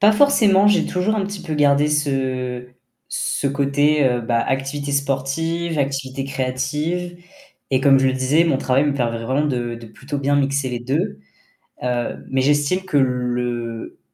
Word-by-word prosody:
Pas 210 +2 +6
forcément, 210 -6 +4
j'ai 205 -1 +3
toujours 185 +4 0
un 210 -2 0
petit 200 0 -6
peu 155 - -4
gardé 145 0 +3
ce 130 -4 -1 0.4
ce 140 - -2
côté, 140 -1 +2
bah, 115 -1 +2
activité 135 +2 -2
sportive, 140 +4 -1
activité 135 -1 -2
créative 150 +7 -2 0.5
et 130 0 +2
comme 135 0 +5
je 135 - +3
le - - +1
disais, 130 +5 +2
mon 155 -5 +2
travail 135 +2 +2
me 145 - +1
permet 115 -3 -1
vraiment 135 +6 0
de 120 -4 -2
de 115 0 -11
plutôt 140 +6 -6
bien 140 +1 +1
mixer 140 -1 0
les 120 -1 -4
2 120 - -2 0.6
heu, 125 -1 -2
mais 135 0 +1
j'estime 145 +6 +2
que 185 -6 -1
le 125 -3 -2
140 Hz, 160 wpm, -21 LUFS, 130-150 Hz, 0.6 s, Pas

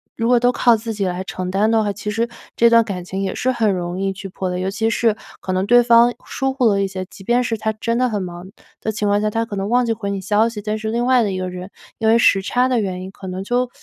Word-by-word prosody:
如 230 - -1
果 245 0 +4
都 245 +1 +3
靠 240 -1 +4
自 225 +1 -5
己 200 -2 -2
来 180 +1 -2
承 180 +1 -5
担 205 +3 +2
的 220 -1 +3
话， 205 - 0
其 210 - -6
实 230 +2 -1 0.3
这 235 0 +5
段 230 0 +6
感 190 -4 -5
情 190 +2 -5
也 190 - -2
是 255 - 0
很 220 -5 +1
容 175 0 -3
易 195 0 -1
去 195 0 -8
破 185 0 -4
裂。 180 - -3
尤 190 +1 -1
其 220 +3 -1
是 225 -1 +1 0.2
可 185 - -3
能 185 +1 0
对 245 +3 +6
方 235 0 +5
疏 270 0 -2
忽 265 -2 0
了 200 -3 +3
一 - - 0
些， 190 -1 -5
即 195 - -14
便 240 +4 +2
是 225 -2 -2
他 220 +1 -2
真 230 +2 -2
的 255 0 +2
很 205 -3 -2
忙 175 0 -7 0.3
的 220 - -2
情 210 -1 -2
况 205 0 +2
下， 215 0 0
他 225 +1 0
可 205 - -6
能 195 +2 -3
忘 245 0 +3
记 - - +1
回 205 -3 -3
你 195 -1 -3
消 210 +3 +2
息， 210 -3 -7
但 215 +1 -2
是 220 0 -4
另 235 +2 0
外 255 -2 +4
的 200 - -1
一 185 - -3
个 185 0 -3
人， 180 +2 -8 0.3
因 220 - -1
为 225 +1 +5
时 195 -4 +4
差 250 +5 +1
的 250 -3 +1
原 185 -3 -3
因， 185 - -7
可 190 - -10
能 185 +1 -4
就 245 +3 0
210 Hz, 330 characters per minute, -20 LUFS, 190-235 Hz, 0.3 s, 段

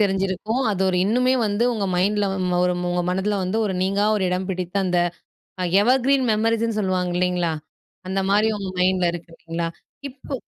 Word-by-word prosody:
தெரிஞ்சிருக்கும் 195 +4 0
அது 190 -2 -1
ஒரு 185 - +1
இன்னுமே 250 +5 +2
வந்து 205 +3 0
உங்க 210 -4 -2
மைண்டில 200 +3 +1 0.4
ஒரு 180 0 +1 0.2
உங்க 175 - 0
மனதில 190 +2 0
வந்து 185 +4 -2
ஒரு 200 - -1
நீங்கா 195 +2 +1
ஒரு 205 - -1
இடம் 180 +1 -1
பிடித்த 180 0 -4
அந்த 180 -1 +1 0.8
எவர்கிரீன் 265 +3 +3
மெமரீஸ்ன்னு 225 0 0
சொல்லுவாங்க 185 -2 -1
இல்லைங்களா? 180 -2 0 0.6
அந்த 195 +1 0
மாதிரி 210 +2 +3
உங்க 195 -1 -4
மைண்டில 180 -1 +2
இருக்கு 170 0 -8
இல்லைங்களா? 165 0 -4 0.4
இப்போ 270 +1 -8
195 Hz, 160 wpm, -22 LUFS, 180-215 Hz, 0.8 s, எவர்கிரீன்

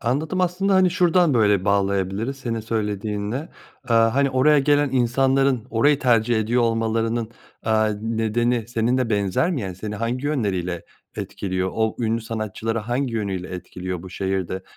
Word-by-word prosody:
Anladım. 150 +10 -1
Aslında, 185 +2 +1
hani, 185 -1 +4
şuradan 175 -4 +3
böyle 105 -4 +3
bağlayabiliriz 100 +5 0
senin 115 -4 -3
söylediğinle. 105 - -3 0.4
Aaa, 115 0 +4
hani, 140 -1 +2
oraya 145 +3 +4
gelen 145 0 +2
insanların 130 0 +2
orayı 140 +6 +3
tercih 120 -3 +2
ediyor 120 +3 +1
olmalarının, 115 0 0 0.3
aaa, 110 0 +2
nedeni 115 +1 0
senin 120 +2 +1
de 120 -3 -1
benzer 100 - +1
mi? 155 -8 -1
Yani, 95 -3 -5
seni 105 +3 -6
hangi 120 +5 -2
yönleriyle 95 - -2 0.3
etkiliyor 95 -1 -3
o 110 -1 0
ünlü 115 0 0
sanatçıları 110 0 -3
hangi 120 +2 -2
yönüyle 95 -4 -3
etkiliyor 90 0 -6
bu 95 - -10
şehir 95 -1 -2
de? 95 0 -4
115 Hz, 150 wpm, -22 LUFS, 105-130 Hz, 0.4 s, hani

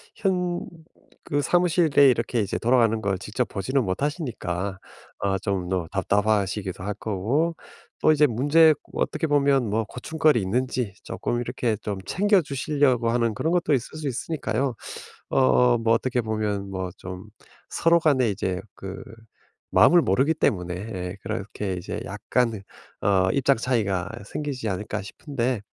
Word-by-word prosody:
현 180 -3 0 0.6
그 145 0 0
사무실에 165 -4 +4
이렇게 115 0 0
이제 100 - -2
돌아가는 115 -2 +3
걸 100 -3 -1
직접 110 +5 -2
보지는 130 +7 0
못하시니까 100 - -3 0.4
아 95 -1 0
좀 95 -3 -2
너 90 -3 -1
답답하시기도 100 -1 0
할 105 - -1
거고 115 - 0 0.5
또 155 - +5
이제 150 0 +4
문제 145 +7 +5 0.2
어떻게 160 - -1
보면 140 -4 +3
뭐 110 +2 +1
고충거리 135 +3 +1
있는지 120 +1 -1
쪼끔 120 0 -3
이렇게 120 -1 -1
좀 105 -2 -4
챙겨주시려고 145 - +2
하는 115 -1 +1
그런 135 +9 -1
것도 175 -4 +2
있을 130 +4 -2
수 150 - -3
있으니까요. 135 -1 -2 0.6
어 125 -2 +4
뭐 115 0 +3
어떻게 125 +1 0
보면 105 -3 -2
뭐 95 -1 -4
좀 90 0 -8 0.5
서로 170 +1 +3
간의 135 -8 +3
이제 95 -1 -2
그 95 0 -8 0.7
마음을 175 -1 +6
모르기 135 +11 +2
때문에 90 - 0
예 90 -1 -5
그렇게 100 0 -4
이제 90 - -5
약간의 115 -5 -1 0.4
어 95 -2 +3
입장 140 -1 +3
차이가 100 -7 -1 0.2
생기지 135 -6 -4
않을까 105 +2 -3
싶은데 125 0 -3
115 Hz, 305 characters per minute, -25 LUFS, 100-140 Hz, 0.7 s, 마음을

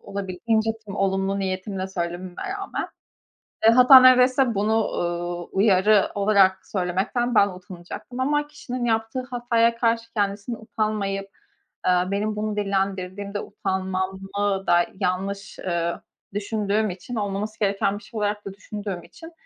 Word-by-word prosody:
olabildiğince 200 +3 -1 0.2
tüm 200 0 -6
olumlu 195 0 0
niyetimle 190 0 -3
söylememe 175 0 -4 0.2
rağmen. 390 - -4 0.8
Eee, 225 - +9
hatta 255 +2 +9
neredeyse 255 -1 +5
bunu, 215 +2 +1
ııı, 175 0 -2
uyarı 200 +1 +3
olarak 200 -2 +3
söylemekten 200 +6 -1
ben 200 -1 +5
utanacaktım. 185 +6 -9
Ama 295 +2 +1
kişinin 255 -4 -5
yaptığı 225 +2 0
hataya 235 -1 +2
karşı 230 -1 0
kendisinin 205 +2 -1
utanmayıp, 210 -3 -2 0.6
eee, 185 - +5 0.2
benim 210 +2 -1
bunu 210 0 -2
dillendirdiğimde 195 0 -2
utanmamı 190 0 -2
da 175 0 +4
yanlış, 195 +2 -2
eee, 170 -1 -1 0.4
düşündüğüm 210 0 0
için 190 +7 -7
olmaması 205 +1 -3
gereken 200 0 +1
bir 215 - -17
şey 230 - -8
olarak 210 0 -1
da 195 - -6
düşündüğüm 200 -3 -6
için, 325 - -13
200 Hz, 125 wpm, -24 LUFS, 190-225 Hz, 0.8 s, Eee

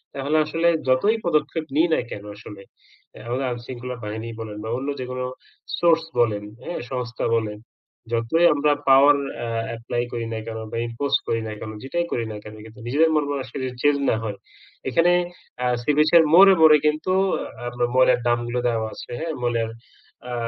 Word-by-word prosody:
তাহলে 140 +3 0
আসলে 165 +2 0 0.2
যতই 200 - +3
পদক্ষেপ 155 -1 0
নিই 160 +3 +4
না - - +3
কেনো 105 0 -7
আসলে? 105 -1 -11 0.5
এ - - -11
আমাদের 130 +3 -1
আইন 120 -1 -2
শৃঙ্খলা 125 0 -6
বাহিনী 110 +2 -5
বলেন 110 -2 -6
বা 110 - -5
অন্য 135 +2 -5
যেকোনো 125 0 -4 0.5
সোর্স 165 -1 +4 0.2
বলেন, 105 -3 +2 0.2
হ্যাঁ? 175 - -4
সংস্থা 125 -2 -3
বলেন, 105 -2 -2 0.5
যতই 115 +9 +2
আমরা 150 0 +2 0.2
পাওয়ার 140 +2 +7 0.3
আ - - -4 0.2
অ্যাপ্লাই 115 +1 -3
করি 115 -1 -3
না 110 - -3
কেন 110 0 -5
বা - - -4
ইম্পজ 120 +5 -3
করি 115 0 0
না - - -5
কেনো, 110 - -7
যেটাই 170 +6 -1
করি 115 - -1
না - - -6
কেনো? 105 0 -10
কিন্তু 110 +3 -14
নিজেদের 155 +6 +3
মনমানসিকতা 140 -3 -2
যদি 125 -1 -5
চেঞ্জ 145 -1 +4
না - - +3
হয়, 105 -3 -4 0.5
এখানে 170 +1 +3 0.5
আ - - +2 0.2
সি 150 - +2
বিচ 155 +1 +5
এর 165 - +7
মোড়ে, 195 +3 +9
মোড়ে 155 -1 +8
কিন্তু 155 +4 +1 0.6
আপনার 120 0 -1
ময়লার 130 -1 +5
ড্রামগুলো 120 0 0
দেওয়া 115 -2 0
আছে, - - -10
হ্যাঁ? 160 0 -3
ময়লার 115 -2 0 0.6
আ - - -3
125 Hz, 180 wpm, -23 LUFS, 115-150 Hz, 0.6 s, মোড়ে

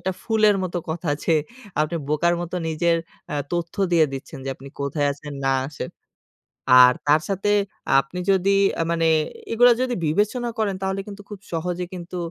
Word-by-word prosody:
একটা 190 +2 -2
ফুলের 215 -2 +3
মত 185 -1 -4 0.2
কথা 160 +1 -4 0.2
যে, 165 - +3 0.5
আপনি 155 +2 0
বোকার 170 +3 +2
মত 175 0 -6 0.2
নিজের 165 +2 +2 0.4
আ - - -1 0.2
তথ্য 170 -1 -2 0.2
দিয়ে 165 -2 +6
দিচ্ছেন 135 0 -7
যে 135 - -4
আপনি 135 +1 -12
কোথায় 145 +1 0
আছেন 145 +1 -9
না 135 - +3
আসেন। 145 - -6 0.9
আর 125 0 +7
তার 150 +2 +5
সাথে 195 +1 0 0.5
আপনি 135 +7 -5
যদি 195 +1 +3 0.3
আ - - +3
মানে 165 -1 +2 0.4
এগুলা 245 +2 +6
যদি 250 -1 0
বিবেচনা 210 +9 0
করেন 210 -3 0
তাহলে 190 0 -1
কিন্তু 205 0 -9
খুব 205 -2 -8
সহজে 180 +2 -2
কিন্তু 180 0 -7
175 Hz, 170 wpm, -23 LUFS, 155-195 Hz, 0.9 s, আর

